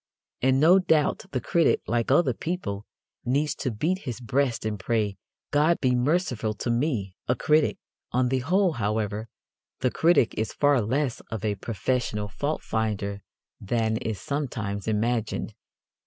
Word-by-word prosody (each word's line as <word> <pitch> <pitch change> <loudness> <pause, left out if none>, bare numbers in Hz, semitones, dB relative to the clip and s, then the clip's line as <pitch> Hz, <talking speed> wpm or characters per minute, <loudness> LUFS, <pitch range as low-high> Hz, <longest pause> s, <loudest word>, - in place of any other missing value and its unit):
And 130 +1 +3
no 175 +6 +7
doubt 160 -5 +2
the 130 - -1
critic, 165 +7 +2
like 115 0 0
other 135 -1 +4
people, 115 - -4 0.4
needs 140 +5 +1
to 130 - -1
beat 155 - -1
his 125 - -5
breast 125 -1 0
and 105 -2 -2
pray, 105 -2 -1 0.3
"God 155 +4 +3
be 130 -2 +2
merciful 125 - 0
to 120 - -2
me, 115 - -1
a 125 - +2
critic." 155 +2 +2 0.3
On 125 +1 +2
the 130 0 +1
whole, 180 +8 +2
however, 110 -3 -2 0.5
the 125 - +2
critic 165 -8 +3
is 110 - -2
far 145 -3 +3
less 130 +4 0
of 110 -1 -4
a 105 - +1
professional 105 0 -2
faultfinder 105 -5 -2 0.4
than 110 +1 0
is 110 -2 -3
sometimes 110 -9 -3
imagined. 110 +1 -1
120 Hz, 145 wpm, -26 LUFS, 110-145 Hz, 0.5 s, no